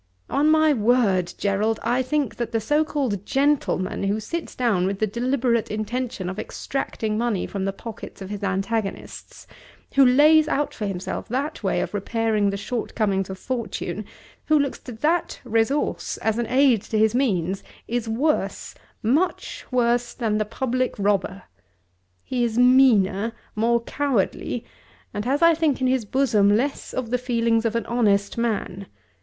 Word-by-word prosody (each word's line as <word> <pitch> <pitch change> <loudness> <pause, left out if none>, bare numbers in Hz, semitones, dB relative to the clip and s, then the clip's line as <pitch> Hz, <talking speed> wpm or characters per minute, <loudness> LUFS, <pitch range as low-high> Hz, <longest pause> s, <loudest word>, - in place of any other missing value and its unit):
On 295 +2 +3
my 315 -1 +5
word, 215 -7 +2
Gerald, 210 +2 0
I 245 +3 +1
think 280 -1 -1
that 235 -1 -3
the 225 - +1
so 295 +8 +2
called 260 -11 -2
gentleman 270 -9 0
who 205 +2 0
sits 335 +10 -5
down 210 -8 +1
with 195 0 -2
the 215 - +1
deliberate 235 +1 0
intention 215 -2 -3
of 190 +3 -4
extracting 220 -5 -3
money 235 -5 0
from 195 -1 -4
the 195 - 0
pockets 220 +2 -9
of 195 0 -7
his 205 -1 -5
antagonists, 195 +2 -3 0.5
who 275 - +6
lays 300 +5 +6
out 290 0 0
for 210 - -4
himself 185 -2 -4
that 275 +6 -2
way 195 - 0
of - - -4
repairing 215 0 0
the 200 - -2
shortcomings 205 -3 -2
of 190 - -6
fortune, 245 +3 -4 0.4
who 310 - +5
looks 280 -2 -1
to 250 - -9
that 310 +9 0
resource 235 +4 0
as 220 +1 +1
an 235 - -1
aid 255 -3 +4
to 220 - -3
his 220 0 +3
means, 195 -8 0 0.2
is 235 -1 -2
worse, 285 +8 -1 0.3
much 305 +11 0
worse, 240 -1 +1
than 215 -3 0
the 215 - 0
public 255 +3 -1
robber! 195 -2 0 0.8
He 245 -1 -1
is 230 -1 -1
meaner, 230 -5 +4 0.2
more 235 +2 +2
cowardly, 245 -3 -1 0.5
and 205 +1 -3
has 280 +6 +1
I 335 0 +7
think 315 -4 +1
in 260 - 0
his 255 -3 +1
bosom 210 -5 +3
less 275 +4 -2
of 240 -3 -4
the 250 - +1
feelings 230 -2 +1
of 225 0 0
an 230 - -1
honest 205 -4 +1
man. 205 -4 -2
230 Hz, 160 wpm, -23 LUFS, 205-260 Hz, 0.8 s, I